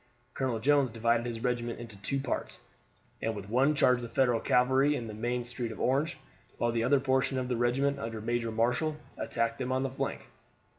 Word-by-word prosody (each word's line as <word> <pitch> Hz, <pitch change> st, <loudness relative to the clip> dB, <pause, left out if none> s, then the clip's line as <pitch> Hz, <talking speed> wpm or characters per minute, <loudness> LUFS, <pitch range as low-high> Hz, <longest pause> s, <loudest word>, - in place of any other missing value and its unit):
Colonel 130 Hz, -4 st, -1 dB
Jones 140 Hz, +3 st, +3 dB
divided 115 Hz, +1 st, +1 dB
his 115 Hz, -1 st, -5 dB
regiment 120 Hz, -2 st, -1 dB
into 115 Hz, -3 st, -9 dB
two 100 Hz, +8 st, -2 dB
parts, 135 Hz, -2 st, -3 dB, 0.6 s
and 115 Hz, 0 st, -1 dB
with 100 Hz, -1 st, -7 dB
one 135 Hz, +6 st, +3 dB
charged 125 Hz, -3 st, +4 dB
the 120 Hz, -, -6 dB
Federal 120 Hz, -1 st, +2 dB
cavalry 130 Hz, +5 st, +3 dB
in 120 Hz, -, -3 dB
the 110 Hz, -, -6 dB
main 120 Hz, +3 st, -2 dB
street 120 Hz, -1 st, -4 dB
of 110 Hz, -, -9 dB
Orange, 140 Hz, +6 st, +1 dB, 0.4 s
while 120 Hz, -, +1 dB
the 115 Hz, 0 st, 0 dB
other 135 Hz, +3 st, +4 dB
portion 130 Hz, 0 st, +1 dB
of 130 Hz, -1 st, -2 dB
the 125 Hz, -, +1 dB
regiment, 135 Hz, +4 st, +1 dB
under 115 Hz, -4 st, -4 dB
Major 115 Hz, +1 st, -1 dB
Marshall, 125 Hz, +8 st, +1 dB, 0.2 s
attacked 115 Hz, -1 st, -1 dB
them 125 Hz, -, -2 dB
on 130 Hz, +1 st, +1 dB
the 135 Hz, -, -2 dB
flank. 130 Hz, -, -4 dB
120 Hz, 200 wpm, -30 LUFS, 115-135 Hz, 0.6 s, charged